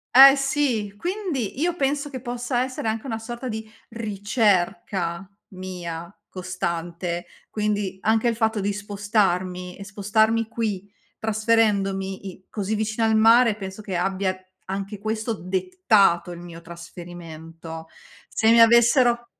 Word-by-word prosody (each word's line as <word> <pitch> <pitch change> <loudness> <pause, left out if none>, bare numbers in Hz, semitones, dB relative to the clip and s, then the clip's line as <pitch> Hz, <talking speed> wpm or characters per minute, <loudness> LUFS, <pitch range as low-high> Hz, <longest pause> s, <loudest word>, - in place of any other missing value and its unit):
Eh 270 +1 +11
sì, 270 -7 0
quindi 345 - -3
io 345 +1 +1
penso 285 -1 0
che 260 -3 -7
possa 245 0 -1
essere 255 -3 -4
anche 220 +2 -2
una 225 -4 -3
sorta 240 +3 -6
di 220 -2 -5 0.2
ricerca, 195 -5 0 0.2
mia, 175 -3 -6 0.2
costante, 175 -1 -4 0.3
quindi 210 -3 -1
anche 220 +2 +2
il 235 - +1
fatto 220 -1 +1
di 200 +1 -1
spostarmi 195 -3 -1
e 200 - -8
spostarmi 220 +2 +1
qui, 210 -4 -3 0.3
trasferendomi 205 -3 +1
i 185 0 -14
così 205 0 -3
vicino 220 +1 0
al 220 0 +3
mare, 225 +1 +6
penso 190 0 -7
che 190 -3 -4
abbia, 190 +1 0 0.3
anche 195 +2 -4
questo, 220 +2 -2
dettato 195 - +2
il 170 - -8
mio 170 -1 -10
trasferimento. 165 -1 -10 0.4
Se 220 - +1
mi 230 +1 +6
avessero 235 +1 +5
210 Hz, 130 wpm, -24 LUFS, 185-230 Hz, 0.4 s, Eh